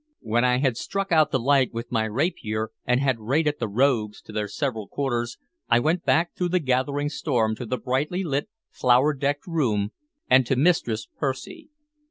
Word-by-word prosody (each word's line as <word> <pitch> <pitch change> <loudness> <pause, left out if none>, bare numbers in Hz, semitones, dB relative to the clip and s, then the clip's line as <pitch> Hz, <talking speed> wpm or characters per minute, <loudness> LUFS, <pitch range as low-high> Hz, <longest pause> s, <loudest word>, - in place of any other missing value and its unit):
When 115 +2 +1
I 125 0 +3
had 130 -3 +1
struck 195 +6 -3
out 155 -2 +5
the 130 - +1
light 130 -1 +2
with 115 +1 -5
my 110 -2 +1
rapier, 110 - -2
and 125 +1 +2
had 130 -4 +1
rated 145 +7 0
the 115 - -1
rogues 110 -1 +1
to - - -12
their 105 -1 -2
several 115 -5 -3
quarters, 120 -4 -2 0.3
I 120 - +5
went 160 +7 0
back 170 +2 +2
through 180 -1 -1
the 180 +1 +2
gathering 140 +1 0
storm 120 -8 0
to 120 - -6
the 125 - -1
brightly 135 - -1
lit, 145 +2 -2 0.2
flower 130 +4 +3
decked 145 +2 -2
room, 115 - 0 0.4
and 130 +1 +6
to 135 - +2
Mistress 125 -7 +1
Percy. 230 - -4
130 Hz, 185 wpm, -25 LUFS, 115-150 Hz, 0.4 s, and